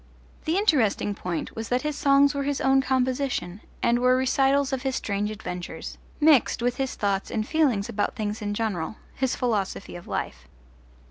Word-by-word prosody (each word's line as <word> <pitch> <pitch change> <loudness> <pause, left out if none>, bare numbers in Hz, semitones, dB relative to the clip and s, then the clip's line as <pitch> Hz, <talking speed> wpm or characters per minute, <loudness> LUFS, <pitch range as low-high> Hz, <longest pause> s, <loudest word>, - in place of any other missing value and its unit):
The 320 +4 +1
interesting 255 - +2
point 180 -4 -4
was 225 0 -5
that 250 +2 +1
his 300 -1 -2
songs 280 +1 +4
were 280 - -2
his 280 0 -1
own 270 0 +4
composition 260 -7 -1 0.2
and 235 0 +3
were 250 +1 +4
recitals 270 +1 +2
of 260 - -1
his 265 -1 -1
strange 205 -2 -1
adventures, 180 -4 -6 0.2
mixed 295 -6 +4
with 245 0 0
his 265 -1 -2
thoughts 200 -1 -1
and 215 -1 -2
feelings 265 -11 +2
about 210 -3 -2
things 210 0 -3
in 205 0 -2
general 210 -4 -2 0.2
his 265 -1 -1
philosophy 205 -6 -2
of 175 - -10
life. - - -4
245 Hz, 175 wpm, -25 LUFS, 205-270 Hz, 0.2 s, songs